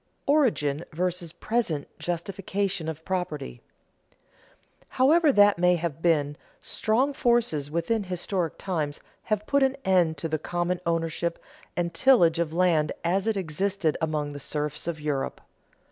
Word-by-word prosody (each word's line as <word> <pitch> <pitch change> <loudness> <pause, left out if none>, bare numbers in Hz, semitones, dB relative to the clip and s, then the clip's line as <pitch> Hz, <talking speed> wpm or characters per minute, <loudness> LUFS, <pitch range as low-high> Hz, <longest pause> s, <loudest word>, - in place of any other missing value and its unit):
[Sidenote: - - -44 0.2
Origin 155 - +1
vs. 175 0 -2
present 215 -11 -1
justification 190 +1 -2
of 160 0 -7
property] 165 - -3 1.3
However 305 +4 +4
that 205 -6 +5
may 180 0 +4
have 165 -2 -3
been, 145 -4 +2 0.2
strong 255 +6 0
forces 235 - +1
within 170 +7 -1
historic 180 -2 -2
times 155 -6 -3 0.3
have 215 -1 -1
put 280 +4 +2
an 270 0 +2
end 175 -4 +3
to 155 - -3
the 155 -1 -2
common 175 +2 -1
ownership 165 0 -1 0.4
and 170 -1 -1
tillage 175 -12 +5
of 170 -2 0
land 165 -3 +2
as 190 +5 +1
it 220 -2 +1
existed 185 -1 -1
among 155 -2 -1
the 145 - -7
serfs 150 +2 -3
of 165 -2 -3
Europe. 145 -3 -2
175 Hz, 140 wpm, -26 LUFS, 155-200 Hz, 1.3 s, that